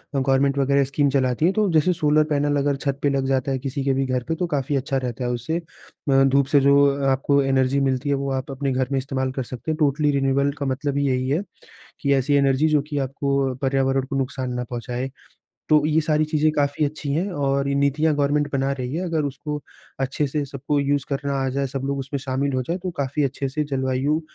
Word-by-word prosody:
अ, 135 Hz, -, +2 dB
government 135 Hz, +1 st, +2 dB
वग़ैरह 140 Hz, 0 st, +3 dB
scheme 140 Hz, +1 st, +1 dB
चलाती 130 Hz, +2 st, +1 dB
हैं 185 Hz, -, +3 dB
तो 210 Hz, -3 st, +2 dB
जैसे 155 Hz, -2 st, +3 dB
कि 180 Hz, -, +3 dB
सोलर 150 Hz, 0 st, +4 dB
पैनल 145 Hz, 0 st, +1 dB
अगर 140 Hz, 0 st, +1 dB
छत 140 Hz, 0 st, -3 dB
पे 145 Hz, -, +3 dB
लग 135 Hz, -1 st, 0 dB
जाता 135 Hz, 0 st, 0 dB
है 130 Hz, -, -1 dB
किसी 135 Hz, +1 st, -3 dB
के 135 Hz, -1 st, +2 dB
भी 135 Hz, 0 st, 0 dB
घर 130 Hz, -1 st, -1 dB
पे 165 Hz, -, 0 dB
तो 180 Hz, +1 st, -2 dB
काफ़ी 145 Hz, -2 st, -1 dB
अच्छा 135 Hz, 0 st, -1 dB
रहता 125 Hz, -1 st, -3 dB
है 120 Hz, -, -1 dB
उससे 140 Hz, +9 st, -2 dB, 0.5 s
म 135 Hz, 0 st, +5 dB
धूप 140 Hz, 0 st, +3 dB
से 145 Hz, 0 st, +4 dB
जो 140 Hz, +1 st, +5 dB, 0.2 s
अ, 140 Hz, -1 st, -2 dB
आपको 140 Hz, +1 st, +2 dB
एनर्जी 135 Hz, 0 st, +2 dB
मिलती 130 Hz, +2 st, -1 dB
है 140 Hz, -, +3 dB
वो 140 Hz, 0 st, -2 dB
आप 130 Hz, +1 st, -3 dB
अपने 135 Hz, 0 st, -2 dB
घर 130 Hz, -1 st, 0 dB
में 135 Hz, -, +1 dB
इस्तेमाल 130 Hz, 0 st, -2 dB
कर 130 Hz, -1 st, -3 dB
सकते 130 Hz, +6 st, -5 dB
हैं। 155 Hz, -, -2 dB
टोटली 150 Hz, -1 st, +2 dB
रिन्यूएबल 140 Hz, 0 st, +1 dB
का 140 Hz, -, -3 dB
मतलब 140 Hz, +1 st, -1 dB
ही 140 Hz, -, +1 dB
यही 130 Hz, 0 st, 0 dB
है, 155 Hz, +7 st, +1 dB, 0.6 s
कि 140 Hz, -1 st, +1 dB
ऐसी 135 Hz, +2 st, +1 dB
एनर्जी 140 Hz, +2 st, +3 dB
जो 150 Hz, -2 st, +3 dB
कि 145 Hz, -2 st, -2 dB
आपको 140 Hz, +1 st, -1 dB
अ, 130 Hz, -, -4 dB
पर्यावरण 135 Hz, 0 st, +1 dB
को 135 Hz, -, -1 dB
नुकसान 130 Hz, -2 st, -2 dB
न -, -, -3 dB
पहुँचाए। 125 Hz, +2 st, -4 dB, 0.6 s
तो 150 Hz, -1 st, +4 dB
ये 155 Hz, +1 st, +3 dB
सारी 155 Hz, 0 st, +1 dB
चीज़ें 155 Hz, 0 st, +2 dB
काफ़ी 145 Hz, +1 st, +1 dB
अच्छी 145 Hz, -1 st, -3 dB
हैं 180 Hz, +7 st, 0 dB
और 140 Hz, -2 st, 0 dB
ये 140 Hz, -, 0 dB
नीतियाँ 145 Hz, +3 st, +2 dB
गवर्नमेंट 145 Hz, 0 st, +1 dB
बना 135 Hz, 0 st, 0 dB
रही 130 Hz, +1 st, -4 dB
है 180 Hz, +3 st, -2 dB
अगर 165 Hz, -3 st, 0 dB
उसको 150 Hz, +2 st, -4 dB, 0.4 s
अच्छे 135 Hz, +2 st, 0 dB
से 145 Hz, +1 st, -2 dB
सबको 140 Hz, +1 st, -2 dB
यूज़ 140 Hz, -1 st, 0 dB
करना 140 Hz, 0 st, -2 dB
आ -, -, 0 dB
जाएँ 140 Hz, -1 st, +1 dB
सब 135 Hz, +1 st, -5 dB
लोग 140 Hz, 0 st, -1 dB
उसमें 135 Hz, +1 st, -4 dB
शामिल 135 Hz, +1 st, -1 dB
हों 130 Hz, -, 0 dB
जाएँ 175 Hz, +2 st, -1 dB
तो 185 Hz, -, -2 dB
काफ़ी 140 Hz, +2 st, 0 dB
अच्छे 135 Hz, 0 st, -2 dB
से 150 Hz, +3 st, -2 dB
जलवायु 135 Hz, +2 st, 0 dB
140 Hz, 245 wpm, -23 LUFS, 135-145 Hz, 0.6 s, म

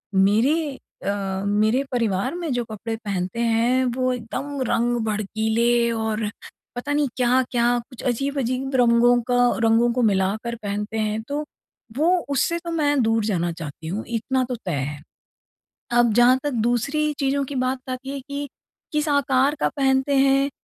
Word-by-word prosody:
मेरी 260 Hz, +10 st, +2 dB, 0.3 s
अ, 195 Hz, -1 st, -2 dB
मेरे 215 Hz, +6 st, +2 dB
परिवार 230 Hz, -, 0 dB
में 340 Hz, -4 st, -3 dB
जो 245 Hz, -1 st, 0 dB
कपड़े 225 Hz, +1 st, -5 dB
पहनते 200 Hz, -1 st, -3 dB
हैं 235 Hz, +3 st, +2 dB
वो 255 Hz, 0 st, +1 dB
एकदम 265 Hz, +4 st, -5 dB
रंग 240 Hz, +1 st, +1 dB
भड़कीले 220 Hz, +3 st, +1 dB
और 220 Hz, -1 st, -1 dB, 0.5 s
पता 285 Hz, +4 st, -3 dB
नहीं 295 Hz, -1 st, +2 dB
क्या-क्या 250 Hz, -1 st, +2 dB, 0.2 s
कुछ 250 Hz, -, -11 dB
अज़ीब-अज़ीब 265 Hz, +1 st, -1 dB
रंगों 240 Hz, 0 st, +5 dB
का 245 Hz, -, +3 dB, 0.3 s
रंगों 225 Hz, +1 st, +4 dB
को 250 Hz, -, 0 dB
मिलाकर 205 Hz, +5 st, -1 dB
पहनते 210 Hz, +2 st, -3 dB
हैं। 215 Hz, 0 st, -1 dB
तो 290 Hz, +2 st, -2 dB, 0.5 s
वो 315 Hz, +4 st, +3 dB, 0.2 s
उससे 285 Hz, +5 st, +1 dB
तो 340 Hz, 0 st, -6 dB
मैं 290 Hz, -4 st, +2 dB
दूर 225 Hz, -1 st, +1 dB
जाना 175 Hz, -5 st, 0 dB
चाहती 160 Hz, -1 st, -8 dB
हूँ 200 Hz, +6 st, -3 dB
इतना 255 Hz, +3 st, -1 dB
तो 250 Hz, -, -1 dB
तय 180 Hz, -, -1 dB
है। 145 Hz, +1 st, -4 dB, 1.0 s
अब 235 Hz, -2 st, +4 dB
जहाँ 245 Hz, +2 st, +5 dB
तक 290 Hz, -, -1 dB, 0.2 s
दूसरी 290 Hz, +6 st, 0 dB
चीज़ों 275 Hz, 0 st, +1 dB
की 280 Hz, -, -7 dB
बात 260 Hz, +1 st, -1 dB
आती 255 Hz, +1 st, -5 dB
है 280 Hz, 0 st, -4 dB
कि, 280 Hz, +1 st, -6 dB, 0.4 s
किस 300 Hz, 0 st, 0 dB
आकार 280 Hz, -1 st, +2 dB
का -, -, +3 dB
पहनते 270 Hz, 0 st, +2 dB
हैं 275 Hz, 0 st, +4 dB
240 Hz, 155 wpm, -23 LUFS, 220-275 Hz, 1.0 s, रंगों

